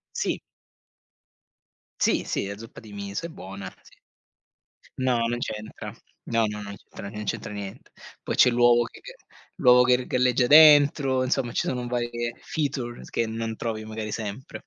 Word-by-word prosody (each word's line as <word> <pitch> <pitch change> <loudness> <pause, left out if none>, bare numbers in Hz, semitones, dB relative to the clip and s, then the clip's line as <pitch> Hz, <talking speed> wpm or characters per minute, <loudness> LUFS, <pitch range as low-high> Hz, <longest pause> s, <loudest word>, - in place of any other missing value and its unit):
Sì. - - -1 1.6
Sì, - - +2
sì, - - -2
la 100 +1 -6
zuppa 115 +1 -11
di 110 - -13
miso 100 +6 -5
è - - -5
buona 95 - -9
sì. - - -20 1.0
No, 125 -3 +1
non 120 +1 -1
c'entra. 110 -2 -6 0.3
No, 115 -1 +2
no, 105 0 -5
non 100 0 -8
c'entra 100 - -10
non 105 0 -6
c'entra 105 - -4
niente. 100 -2 -8 0.3
Poi - - -3
c'è 125 - +6
l'uovo 120 0 +4
che - - -11 0.6
l'uovo 125 -1 +6
che 125 0 +4
r 125 - -6
galleggia 125 0 +2
dentro, 145 -2 +6
insomma 130 -1 0
ci - - -1
sono 125 -1 -2
varie 120 -1 -2
feature 135 -6 -3
che 115 - 0
non 110 0 -4
trovi 110 -2 -4
magari 110 -1 -5
sempre. 110 +3 -6
120 Hz, 160 wpm, -25 LUFS, 105-125 Hz, 1.6 s, c'è